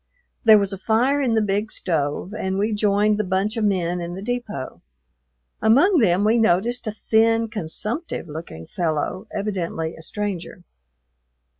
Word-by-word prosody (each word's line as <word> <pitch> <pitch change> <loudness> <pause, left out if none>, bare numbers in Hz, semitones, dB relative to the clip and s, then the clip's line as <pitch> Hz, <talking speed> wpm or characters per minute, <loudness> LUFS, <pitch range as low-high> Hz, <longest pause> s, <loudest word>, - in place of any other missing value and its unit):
There 220 -2 +8
was 200 -1 0
a 195 - -6
fire 245 +8 +2
in 240 -4 +1
the 220 - +3
big 205 +2 -1
stove, 160 +2 -2
and 190 -3 -2
we 210 +2 0
joined 210 0 +2
the - - +2
bunch 195 +3 -1
of 225 - -1
men 180 -3 0
in 170 +1 -5
the 190 - -7
depot. 230 - -4 0.8
Among 295 - +5
them 190 -4 +3
we 220 +3 +3
noticed 225 +4 +1
a - - 0
thin, 225 +1 +2
consumptive 210 - -4
looking 150 - -8
fellow, 170 - -2
evidently 180 -6 -3
a - - -12
stranger. 180 -1 -5
205 Hz, 155 wpm, -22 LUFS, 175-220 Hz, 0.8 s, There